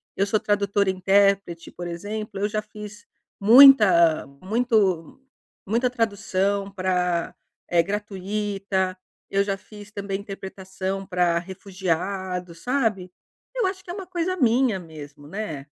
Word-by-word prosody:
eu 195 - +1
sou 210 +1 +1
tradutora 200 -1 +1
intérprete 195 -2 +2
por 175 - -8
exemplo, 205 +4 -5
eu 205 - +1
já 215 0 -2
fiz 210 +1 -11 0.3
muita 210 - +7 0.2
muito 210 - 0 0.5
muita 235 +5 +1
tradução 200 -4 -1
pra 180 -3 -1 0.3
é 170 -1 +4
gratuita, 200 -1 -2 0.3
eu 195 0 +2
já 195 -1 -2
fiz 205 +1 -13
também 200 -1 -4
interpretação 195 -1 -6
pra 180 -3 +1
refugiados, 185 -1 -4
sabe? 225 -9 -1 0.4
Eu - - 0
acho 375 0 -5
que 350 - -8
é - - -4
uma 380 -2 -7
coisa 365 +1 -2
minha 245 - +2
mesmo, 150 -4 -11
né? 160 -6 -5
195 Hz, 125 wpm, -24 LUFS, 185-215 Hz, 0.5 s, muita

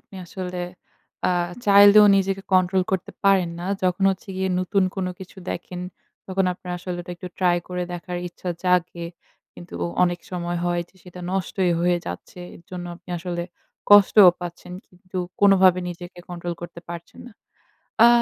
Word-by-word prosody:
আপনি - - -20
আসলে 180 0 -5 0.7
আ - - +2 0.4
চাইলেও 205 +1 +8
নিজেকে 195 0 0
কন্ট্রোল 185 0 +3
করতে 190 -2 -1
পারেন 190 -3 +4
না। 175 - -5 0.2
যখন 185 +1 +1
হচ্ছে 190 +1 -6
গিয়ে 190 0 0
নতুন 195 +2 +1
কোন 185 -1 -1
কিছু 190 +1 -11
দেখেন 180 +1 -6 0.5
তখন 190 0 0
আপনার 180 0 -8
আসলে 180 0 -5
ওটা 175 - -7
একটু 180 +1 -8
ট্রাই 180 -2 +3
করে 180 0 -3
দেখার 175 0 -5
ইচ্ছা 175 +1 -8 0.2
জাগে 175 -1 +1 0.5
কিন্তু 85 -1 -12 0.3
অনেক 175 0 -1
সময় 175 -1 -3
হয় 175 0 0
যে, - - -31
সেটা 180 0 -11
নষ্টই 190 -1 0
হয়ে 175 0 +3
যাচ্ছে। 180 - -7
এর - - -15
জন্য 180 -1 -6
আপনি 180 - -28
আসলে 175 0 -4 0.5
কষ্টও 205 -2 +8
পাচ্ছেন। 175 0 -8
কিন্তু 185 +1 -9 0.2
কোনভাবে 190 -2 +6
নিজেকে 175 +1 -9
কন্ট্রোল 175 -1 -5
করতে 170 0 -8
পারছেন 170 0 -9
না। 245 - -12 0.7
আ - - +9
180 Hz, 160 wpm, -23 LUFS, 175-190 Hz, 0.7 s, আ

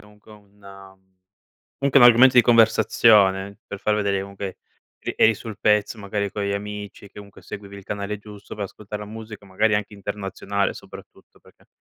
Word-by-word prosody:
comunque 105 +1 -19
un 100 -2 -16 0.8
comunque 140 0 +3
un - - +8
argomento 120 +2 +7
di 125 - +7
conversazione 105 -4 +4
per 100 - -6
far 105 - 0
vedere 100 -2 0
comunque 100 -1 -7 0.4
che - - -5
eri 110 - +5
sul 110 0 -9
pezzo, 105 +1 +2
magari 100 -1 -3
con 105 - -4
gli 100 - -2
amici, 105 0 -7
che 105 - -12
comunque 100 -1 -15
seguivi 100 -1 -10
il 100 - -12
canale 105 +1 -4
giusto 105 0 -12
per 105 - -3
ascoltare 105 +1 -8
la 105 - -9
musica, 110 -1 -10
magari, 105 +3 +1
anche 105 0 -5
internazionale, 100 0 -3
soprattutto. - - -15
Perché - - -24
105 Hz, 175 wpm, -22 LUFS, 100-105 Hz, 0.8 s, un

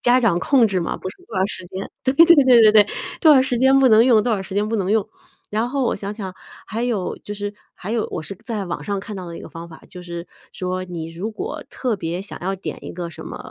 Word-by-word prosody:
家 250 +1 +4
长 200 -8 +3
控 250 - +4
制 190 -2 0
嘛， 170 - -2
不 185 - -6
是 - - -12
多 215 - -8
长 190 - +3
时 185 - -4
间 190 +2 -6
对 260 +1 +2
对 330 - +8
对 330 -5 +7 0.2
对- 215 - +8
对， 210 -1 +7 0.3
多 310 -3 +7
少 260 - +6
时 250 -2 -1
间 265 +1 +5
不 265 - +6
能 225 0 +6
用， 230 -5 +5
多 240 - 0
少 200 - 0
时 190 0 -7
间 210 +1 +1
不 225 - -1
能 190 -2 -1
用。 215 -3 +1 0.4
然 220 +3 0
后 275 -1 0
我 - - +1
想 200 +1 -5
想， 195 -4 -6 0.3
还 225 +2 -3
有 225 -7 -1
就 205 - -6
是 205 0 -5 0.2
还 200 +4 -6
有 230 -2 -1
我 - - -3
是 195 - -6
在 220 -5 -3
网 175 - -5
上 200 -1 -2
看 210 +2 -7
到 185 -2 -6
的 170 -1 -7
一 - - -9
个 - - -9
方 170 +1 -9
法。 160 - -13
就 180 - -10
是 170 0 -7 0.3
说 185 0 -3
你 170 -3 -6
如 185 +7 -4
果 390 - -5
特 245 -4 -1
别 170 -1 -3
想 200 - -8
要 190 +2 -1
点 190 - -7
一 - - -6
个 175 -1 -5
什 165 - -10
么， - - -7
205 Hz, 300 characters per minute, -21 LUFS, 185-235 Hz, 0.4 s, 对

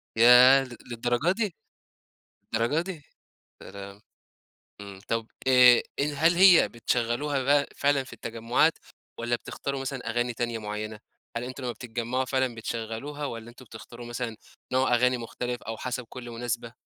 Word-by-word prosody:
ياه! 125 +4 +8
ل 125 -2 -10
للدرجة 120 +7 +1
دي! 205 -3 -2 1.0
للدرجة 115 +8 +1
دي! 175 -3 -6 0.6
يا - - -10
لهوي! 100 0 -10 0.8
إمم، 100 -1 -10
طب 115 -1 -1 0.2
آآ، 125 -2 +7 0.2
ال 145 +1 -1
هل 165 +4 +4
هي 185 -1 +7
بتشغّلوها 120 +4 -1
بقى 140 +2 +3
فعلًا 140 -1 +2
في 125 - -14
التجمعات 115 +7 +1 0.5
والّا 120 0 0
بتختاروا 140 +3 -5
مثلًا 130 -3 -4
أغاني 120 +1 -1
تانية 120 0 -2
معيّنة؟ 105 0 -5 0.4
هل 115 - -2
أنتم 130 +2 -7
لمّا 120 - -2
بتتجمعوها 120 +2 -3
فعلًا 130 -2 0
بتشغّلوها 115 +6 -5
والّا 115 -2 -7
أنتم 125 +2 -15
بتختاروا 120 +1 -11
مثلًا 120 -1 -4 0.4
نوع 130 -1 +3
أغاني 125 +1 +3
مختلف 120 +1 -5
أو 115 - -5
حسب 125 +1 -4
كل 120 -1 -8
مناسبة؟ 120 0 -4
120 Hz, 150 wpm, -27 LUFS, 115-135 Hz, 1.0 s, ياه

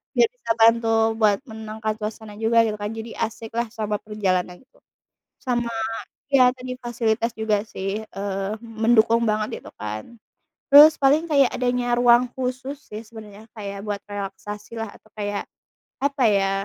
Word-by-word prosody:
Biar 470 - +5
bisa - - -4
bantu 230 0 +5 0.3
buat 210 -2 +4
menangkan 220 -1 -4
suasana 215 0 -6
juga 230 +1 +4
gitu 215 -2 -2
kan, 205 +1 -3
jadi 225 +1 -7
asiklah 230 +1 -3
sama 215 -2 -2
perjalanan, 185 -4 -1
gitu. 265 +1 -28 0.6
Sama 240 -2 -1 0.6
ya 255 -2 +6
tadi 255 0 -6
fasilitas 235 -1 -1
juga 215 -2 +1
sih, 195 +1 -4
eee, 195 -1 -4
mendukung 230 0 +3
banget 215 0 -2
gitu - - -11
kan. 110 - -6 0.5
Terus 295 +2 +10
paling 295 +5 +4
kayak 280 -5 +4
adanya 245 -1 0
ruang 245 0 +5
khusus 260 +2 -3
sih 215 +1 -7
sebenarnya, 215 -2 -12
kayak 200 -2 -6
buat 205 -1 -2
relaksasilah, 210 +2 -6
atau 220 - -24
kayak 205 -1 -2 0.6
apa 280 -2 +1
ya, 195 -2 +2
225 Hz, 145 wpm, -23 LUFS, 210-240 Hz, 0.6 s, Terus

